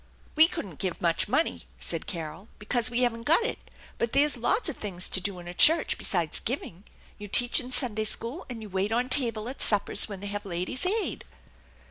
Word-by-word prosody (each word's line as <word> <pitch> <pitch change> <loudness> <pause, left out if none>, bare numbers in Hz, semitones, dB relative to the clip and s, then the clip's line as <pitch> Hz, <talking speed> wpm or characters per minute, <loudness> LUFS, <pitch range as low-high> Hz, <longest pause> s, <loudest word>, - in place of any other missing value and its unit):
" - - -29
We 315 +1 +8
couldn't 190 - -7
give 185 -3 -2
much 170 +2 +1
money/' 265 +9 0
said - - -2
Carol, 165 +2 -6
" - - -30
because 230 +2 0
we 240 +1 0
haven't 235 -2 +1
got 325 - +4
it. 485 - -2 0.4
But 235 - -1
there's 285 +2 +3
lots 245 - 0
of 315 - -3
things 185 -4 -5
to 190 - -1
do 195 0 -2
in 175 -1 -10
a 175 - -6
church 320 - +5
besides 170 -5 -1
giving. 210 -6 -4 0.3
You 205 - -7
teach 240 +4 +3
in 250 0 -7
Sunday 220 -5 +2
school, 235 - -2
and 230 -3 -6
you 210 - -9
wait 195 +2 -1
on 245 +3 +1
table 230 -5 +2
at 260 - -5
suppers 210 +1 +3
when 200 -2 -6
they 200 - -7
have 205 0 -4
Ladies' 185 - -2
Aid." 425 +3 -1
225 Hz, 215 wpm, -27 LUFS, 195-255 Hz, 0.4 s, We